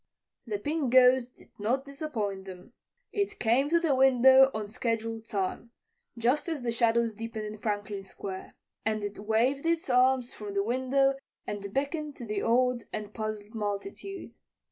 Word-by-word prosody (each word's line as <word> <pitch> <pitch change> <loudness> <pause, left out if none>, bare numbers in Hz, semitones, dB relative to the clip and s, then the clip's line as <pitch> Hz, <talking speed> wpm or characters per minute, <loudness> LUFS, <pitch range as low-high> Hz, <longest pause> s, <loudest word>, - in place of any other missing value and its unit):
The 210 -2 -1
Pink 290 +3 -1
Ghost 255 -1 +5
did - - -19
not 250 +6 0
disappoint 230 -10 -4
them. 185 +5 -11 0.4
It 405 -1 -1
came 245 +5 +2
to 340 +1 +4
the 325 -4 +2
window 265 0 +7
on 215 -3 -4
scheduled 225 0 -3
time 200 +3 -2 0.5
just 250 +8 +1
as 305 -6 -3
the 235 - 0
shadows 230 0 +2
deepened 225 0 -5
in 210 0 -7
Franklin 205 -2 -3
Square 190 0 -7 0.3
and 215 -1 -1
it 205 0 -5
waved 230 +6 +1
its 330 -4 0
arms 250 0 +3
from 205 -1 -7
the 200 - +2
window 260 +4 +2 0.3
and 200 -1 -5
beckoned 290 +3 -2
to 240 - -8
the 210 -2 -2
awed 250 +1 +2
and 210 0 -5
puzzled 215 -1 -5
multitude. 210 - -5
235 Hz, 160 wpm, -29 LUFS, 210-265 Hz, 0.5 s, window